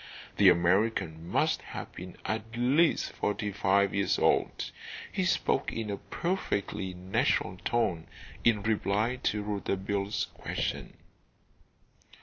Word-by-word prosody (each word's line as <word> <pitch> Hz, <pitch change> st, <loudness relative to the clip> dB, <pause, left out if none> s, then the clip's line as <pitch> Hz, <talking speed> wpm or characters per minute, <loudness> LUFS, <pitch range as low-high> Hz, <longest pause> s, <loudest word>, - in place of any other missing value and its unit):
The -, -, +8 dB
American 85 Hz, -2 st, +2 dB
must -, -, +1 dB
have -, -, -7 dB
been 90 Hz, 0 st, -9 dB
at 110 Hz, +1 st, -3 dB
least 140 Hz, +7 st, +3 dB
forty 105 Hz, 0 st, -2 dB
five 100 Hz, 0 st, +2 dB
years 100 Hz, 0 st, +1 dB
old. -, -, +1 dB, 0.4 s
He 190 Hz, -, 0 dB
spoke 155 Hz, -6 st, +1 dB
in 110 Hz, -2 st, -3 dB
a 100 Hz, -, -2 dB
perfectly 100 Hz, -, -2 dB
natural 90 Hz, 0 st, 0 dB
tone 90 Hz, -6 st, 0 dB, 0.4 s
in 110 Hz, -4 st, +3 dB
reply 110 Hz, +2 st, +1 dB
to 105 Hz, -4 st, -1 dB
Rouletabille's 100 Hz, 0 st, -1 dB
question. -, -, -4 dB
100 Hz, 115 wpm, -30 LUFS, 95-115 Hz, 0.4 s, The